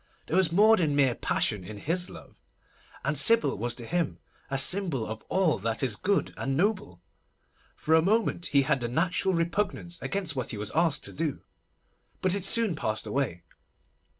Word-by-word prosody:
There 160 - -3
was 185 -4 +4
more 215 +5 +6
than 155 -5 +1
mere 135 -3 +3
passion 105 -3 -1
in 105 +3 -8
his 175 - -1
love; - - -14 0.6
and - - 0
Sybil 230 -1 +4
was 120 +3 -3
to 120 - -9
him 170 +2 -1 0.3
a 135 - -1
symbol 155 - 0
of 110 0 -6
all 185 - +2
that 115 +5 -2
is 125 -6 +1
good 200 - 0
and 135 0 -2
noble. 180 - -1 0.7
For 160 - -1
a 160 - +6
moment 195 -2 +1
he 140 -1 +3
had 135 -3 0
a - - 0
natural 180 +7 0
repugnance 175 0 -2
against 185 -7 -2
what 130 -2 -3
he 110 - -3
was 105 0 -4
asked 165 -2 +1
to - - -5
do, 155 -2 -3 0.8
but 185 -1 +1
it 200 -2 0
soon 220 -4 +3
passed 110 -7 -2
away. 125 -11 -2
160 Hz, 180 wpm, -28 LUFS, 125-185 Hz, 0.8 s, more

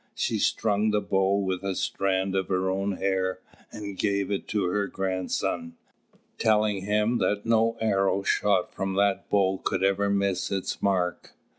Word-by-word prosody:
She - - -1
strung 105 0 +1
the 105 0 +2
bow 95 -1 +1
with 95 -2 -1
a 100 -1 -2
strand 95 0 0
of 95 -1 0
her 95 0 0
own 95 +1 -1
hair, 95 -1 -1 0.3
and 100 -2 -6
gave 100 -1 0
it 100 - -2
to 105 -2 0
her 100 +3 0
grandson, 95 -3 -2 0.6
telling 105 -3 +2
him 105 +3 +1
that 105 0 0
no 115 0 +2
arrow 100 -3 +1
shot 100 -2 +1
from 95 0 -3
that 100 0 +1
bow 95 -2 +2
could - - -1
ever 100 +1 +2
miss 100 -2 0
its 95 -1 -3
mark. 90 -3 -1
100 Hz, 160 wpm, -26 LUFS, 95-105 Hz, 0.6 s, the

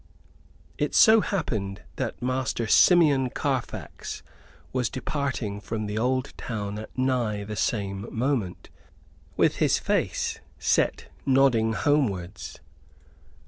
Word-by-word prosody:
It - - -1
so 220 -1 +7
happened 105 - -3
that - - -4
Master 125 -2 -1
Simeon 145 - +5
Carfax 130 -1 -4 0.5
was 125 -3 0
departing 130 -7 -3
from 110 0 -4
the 105 +1 -2
old 130 +3 0
town 105 -3 -4
at 110 - -10
nigh 125 -5 0
the 105 +1 -6
same 100 -2 -2
moment, 115 -6 -2 0.7
with - - +3
his - - +3
face - - -1 0.2
set - - +1 0.2
nodding 130 -5 +3
homewards. 105 - -1
120 Hz, 105 wpm, -26 LUFS, 105-135 Hz, 0.7 s, so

